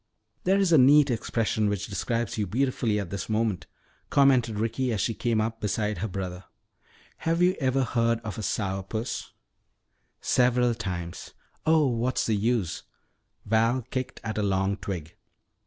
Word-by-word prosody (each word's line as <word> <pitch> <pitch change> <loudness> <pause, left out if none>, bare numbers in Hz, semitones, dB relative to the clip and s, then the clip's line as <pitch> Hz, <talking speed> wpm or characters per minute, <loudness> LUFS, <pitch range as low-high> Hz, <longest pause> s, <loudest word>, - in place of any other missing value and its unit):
"There 190 +2 +4
is 195 -3 +2
a 160 - +7
neat 140 +1 +6
expression 110 -2 0
which 100 -1 -2
describes 115 +3 -2
you 105 -3 -1
beautifully 120 -1 0
at 95 -4 -5
this 100 +1 -4
moment," 110 -4 0 0.4
commented 130 -6 +4
Ricky 115 +4 -1
as 110 - -1
she 115 - 0
came 115 0 0
up 115 +1 -2
beside 105 0 -1
her 110 - -1
brother. 90 -2 -5 0.7
"Have 165 +1 0
you 180 +1 +4
ever 130 -1 +1
heard 115 -2 +1
of 110 -1 -6
a - - -3
'sour 95 -1 -1
puss?" 110 +5 -4 0.9
"Several 125 -1 +3
times. 90 -6 -6 0.3
Oh, 160 -1 +5
what's 125 0 0
the 110 - +1
use!" 105 -4 0 0.6
Val 115 +4 +2
kicked 130 -1 -3
at 110 -1 -3
a - - +1
long 95 0 +1
twig. 85 -7 -6
115 Hz, 155 wpm, -27 LUFS, 100-125 Hz, 0.9 s, a